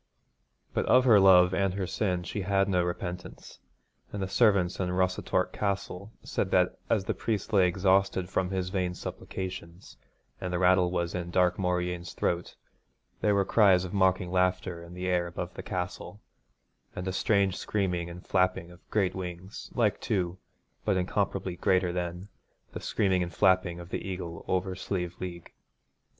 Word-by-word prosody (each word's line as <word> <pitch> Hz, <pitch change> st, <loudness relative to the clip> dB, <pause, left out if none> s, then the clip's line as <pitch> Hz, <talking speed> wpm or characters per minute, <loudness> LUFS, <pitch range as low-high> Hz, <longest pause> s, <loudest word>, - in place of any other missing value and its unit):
But -, -, -1 dB
of 130 Hz, 0 st, +5 dB
her 110 Hz, -5 st, +7 dB
love 90 Hz, -1 st, +7 dB
and 95 Hz, 0 st, +1 dB
her 100 Hz, -2 st, -1 dB
sin 90 Hz, -1 st, -1 dB
she 100 Hz, +4 st, -4 dB
had 95 Hz, +1 st, +2 dB
no 90 Hz, -3 st, +2 dB
repentance, 90 Hz, 0 st, -6 dB, 0.5 s
and 100 Hz, -, -5 dB
the 95 Hz, -, -2 dB
servants 100 Hz, -4 st, +3 dB
in 90 Hz, -1 st, 0 dB
Rossatorc 95 Hz, 0 st, 0 dB
Castle 100 Hz, 0 st, -3 dB
said -, -, -2 dB
that -, -, +2 dB
as 100 Hz, -4 st, +1 dB
the -, -, 0 dB
priest 110 Hz, 0 st, -3 dB
lay 95 Hz, -3 st, +5 dB
exhausted 95 Hz, 0 st, +2 dB
from 95 Hz, 0 st, -1 dB
his 95 Hz, -1 st, -2 dB
vain 90 Hz, -2 st, -1 dB
supplications, 90 Hz, -1 st, -7 dB, 0.4 s
and 90 Hz, -, -3 dB
the 90 Hz, -, 0 dB
rattle 90 Hz, 0 st, +4 dB
was 85 Hz, -1 st, -2 dB
in 85 Hz, -1 st, -3 dB
Dark 90 Hz, 0 st, +2 dB
Mauryeen's 90 Hz, -1 st, -1 dB
throat, 85 Hz, 0 st, -2 dB, 0.7 s
there 105 Hz, -1 st, +3 dB
were 100 Hz, -1 st, +2 dB
cries 95 Hz, -5 st, +4 dB
of 90 Hz, -, -7 dB
mocking 95 Hz, -2 st, +2 dB
laughter 90 Hz, -1 st, 0 dB
in 85 Hz, +1 st, -11 dB
the 90 Hz, 0 st, -4 dB
air 90 Hz, -1 st, +1 dB
above 85 Hz, -, -5 dB
the -, -, -7 dB
castle, 90 Hz, +3 st, -5 dB, 0.8 s
and 90 Hz, -, -4 dB
a 95 Hz, -, -1 dB
strange 100 Hz, -1 st, +2 dB
screaming 90 Hz, -6 st, -1 dB
and 85 Hz, +1 st, -10 dB
flapping 90 Hz, -2 st, +1 dB
of 90 Hz, +1 st, -18 dB
great 100 Hz, -4 st, +1 dB
wings, 90 Hz, +1 st, -7 dB
like 110 Hz, -5 st, +1 dB
to, 95 Hz, -4 st, -1 dB, 0.4 s
but 100 Hz, -3 st, +1 dB
incomparably 95 Hz, 0 st, -1 dB
greater 90 Hz, 0 st, +2 dB
than, 90 Hz, +1 st, -4 dB, 0.4 s
the -, -, -6 dB
screaming 95 Hz, -4 st, +1 dB
and 85 Hz, 0 st, -4 dB
flapping 90 Hz, -2 st, +3 dB
of 85 Hz, 0 st, -10 dB
the -, -, -3 dB
eagle 90 Hz, -3 st, -6 dB
over 95 Hz, 0 st, 0 dB
Slieve 90 Hz, -2 st, -3 dB
League. 85 Hz, -2 st, -7 dB
90 Hz, 165 wpm, -29 LUFS, 90-95 Hz, 0.8 s, her